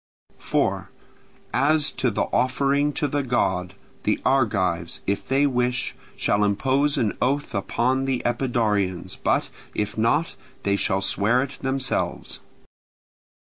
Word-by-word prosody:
4. - - 0 0.6
As 150 +3 +3
to 130 -1 0
the 105 - 0
offering 140 +3 +2
to 150 - 0
the 145 +1 0
god, 95 -8 0 0.3
the - - 0
Argives, 100 -10 +1
if 100 +1 -2
they 135 +2 +3
wish, 125 -2 0 0.2
shall 100 0 +1
impose 135 +8 +2
an 110 -3 0
oath 140 0 0
upon 125 +6 0
the 130 -2 -1
Epidaurians, 105 -7 0
but, - - +1 0.2
if 105 +1 -2
not, 115 +9 +1 0.3
they 100 0 +2
shall 95 -1 +1
swear 110 +6 +2
it 140 0 -8
themselves. 135 -1 -1
125 Hz, 125 wpm, -24 LUFS, 100-135 Hz, 0.6 s, As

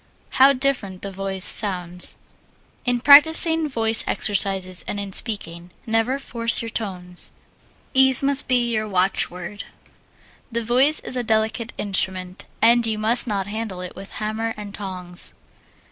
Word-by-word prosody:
How 270 +1 +8
different 250 -9 -2
the 200 - -5
voice 190 0 -4
sounds. 180 -3 0 0.7
In 245 -1 0
practising 320 +3 +6
voice 225 -3 +2
exercises, 190 -3 -1
and 205 - -4
in 200 -1 -6
speaking, 175 -7 -3 0.2
never 225 +3 0
force 230 -4 0
your 230 - -5
tones. 180 -5 -5 0.6
Ease 265 -1 +4
must 280 0 +5
be 240 -2 +2
your 215 -1 -1
watchword. 185 0 -1 0.9
The 235 0 -2
voice 260 +7 +3
is - - -6
a 250 - -1
delicate 220 +1 -1
instrument, 185 -2 -3 0.2
and 235 0 +5
you 220 -1 -1
must 225 +4 +2
not 200 -3 -2
handle 205 -2 -5
it 180 - -8
with 195 +1 -10
hammer 220 +1 -4
and 205 -1 -8
tongs. 180 -4 -5
215 Hz, 140 wpm, -21 LUFS, 190-240 Hz, 0.9 s, How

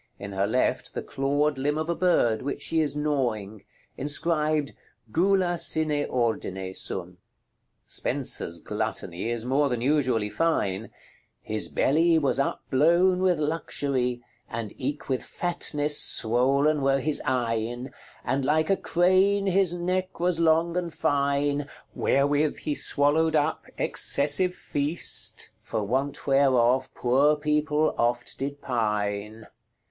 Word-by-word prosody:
In 100 0 -8
her 100 +1 0
left, 125 +4 -1
the - - -3
clawed 145 +1 -1
limb 145 +3 0
of 155 0 -2
a 170 - 0
bird, 165 -11 +2
which 140 - -3
she 160 - +1
is 145 -2 -1
gnawing. 120 -9 -2 0.3
Inscribed 150 0 0 0.4
"GULA 180 - +2
SINE 155 -3 0
ORDINE 95 -6 -2
SUM." 90 -1 -4 0.7
Spenser's 85 - -2
Gluttony 85 +4 -4
is 120 -1 -3
more 140 +3 +1
than 125 -2 -2
usually 125 -6 +1
fine: 110 - -1 0.5
"His 110 0 -2
belly 165 +4 +2
was 140 -4 +1
upblowne 170 +7 +2
with 185 -2 +2
luxury, 140 -5 -2 0.3
And 115 -3 -5
eke 140 +3 -4
with 130 -2 -1
fatnesse 150 -4 +1
swollen 135 +6 +3
were 135 0 +2
his 150 +2 +1
eyne, 120 -1 -2 0.3
And 135 +2 -1
like 155 +6 +1
a 195 - +3
crane 190 +3 +2
his 190 -2 +2
necke 185 +1 -2
was 175 -1 0
long 165 +1 +2
and 175 -2 -2
fyne, 145 -2 0 0.3
Wherewith 145 +2 +1
he 150 - -3
swallowed 155 +3 +1
up 150 +1 0
excessive 150 +6 +2
feast, 145 +4 -2
For 110 -2 -3
want 130 +7 -2
whereof 130 -2 +3
poore 135 +5 +3
people 150 +1 0
oft 120 +1 -1
did 140 +1 -5
pyne." 105 -2 -2
145 Hz, 125 wpm, -26 LUFS, 120-160 Hz, 0.7 s, swollen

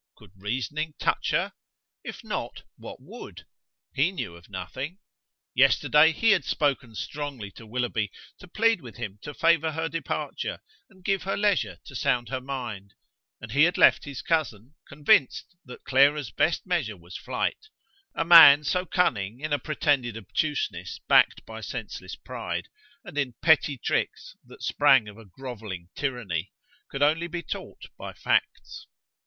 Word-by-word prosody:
Could - - -18
reasoning 130 +10 -3
touch - - 0
her? - - 0 0.5
if - - -8
not, - - -5
what - - -10
would? - - -11 0.5
He 150 +7 +2
knew 125 - -5
of 85 0 -17
nothing. 130 - -6 0.6
Yesterday 155 +2 +5
he 225 +8 +3
had 185 -7 +3
spoken 130 -6 -1
strongly 140 -7 -5
to 110 - -13
Willoughby, 115 -3 -1 0.3
to 190 - -13
plead 225 +1 +2
with 120 -4 -11
him 105 -4 -6
to 145 - -8
favour 165 -1 +3
her 160 +1 -2
departure 165 +1 -4 0.3
and 190 -3 -22
give 195 -2 +1
her 195 +1 -2
leisure 205 -2 +1
to - - -11
sound 125 -4 0
her 130 -1 -3
mind, 120 -7 -6 0.4
and 110 - -9
he 145 +6 +5
had 175 - 0
left - - +5
his 140 -3 -7
cousin, 140 -6 -1
convinced 145 +3 +2
that 125 - -11
Clara's 140 0 +3
best 165 - +1
measure 165 - -1
was 85 +1 -13
flight: 435 - -3 0.5
a - - 0
man 165 -4 +10
so 180 +5 -1
cunning 115 - 0
in 155 +1 -3
a 145 - +1
pretended 140 -7 0
obtuseness 145 +8 -3
backed - - +4
by - - -9
senseless - - -6
pride, - - -5 0.4
and 170 -6 -5
in 130 -4 -2
petty 150 -3 +4
tricks - - -2
that - - -14
sprang 110 - +4
of 105 +1 -11
a 115 - -13
grovelling 105 -5 -8
tyranny, 105 - -3 0.4
could 140 +1 -1
only 160 +4 +2
be 175 0 -5
taught - - -7 0.2
by - - -6
facts. - - -1
140 Hz, 155 wpm, -26 LUFS, 115-160 Hz, 0.6 s, man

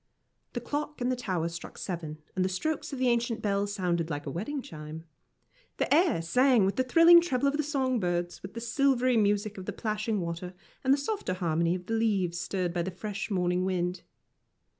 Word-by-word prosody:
The 240 - -2
clock 295 +4 -3
in 245 0 0
the 255 - +1
tower 185 -9 -2
struck 170 0 -8
seven, 165 -5 -5 0.2
and 185 - +1
the 185 - +1
strokes 305 +11 -2
of 275 - -4
the 255 0 +1
ancient 235 -1 0
bell 200 -1 +1
sounded 175 -5 -1
like 145 -2 -4
a 140 - -4
wedding 220 - -3
chime. 155 -1 -8 0.7
The - - +1
air 315 - +3
sang 250 +4 +4
with 195 - 0
the 260 - +2
thrilling 330 +6 +7
treble 280 -5 0
of 280 - +1
the 305 - +1
song 265 -4 0
birds, 175 -2 -2
with 195 +3 -9
the 230 - -4
silvery 255 +1 +2
music 205 -1 +1
of 185 - -8
the - - -2
plashing 215 0 -1
water, 175 +1 -4 0.3
and 265 - +3
the 275 - +6
softer 285 - -2
harmony 170 -1 +1
of 180 -1 -7
the 225 - -3
leaves 195 -6 +1
stirred 180 0 -2
by 175 - 0
the 175 - -2
fresh 205 +4 -5
morning 180 -2 +1
wind. 180 -1 -1
205 Hz, 205 wpm, -29 LUFS, 175-255 Hz, 0.7 s, thrilling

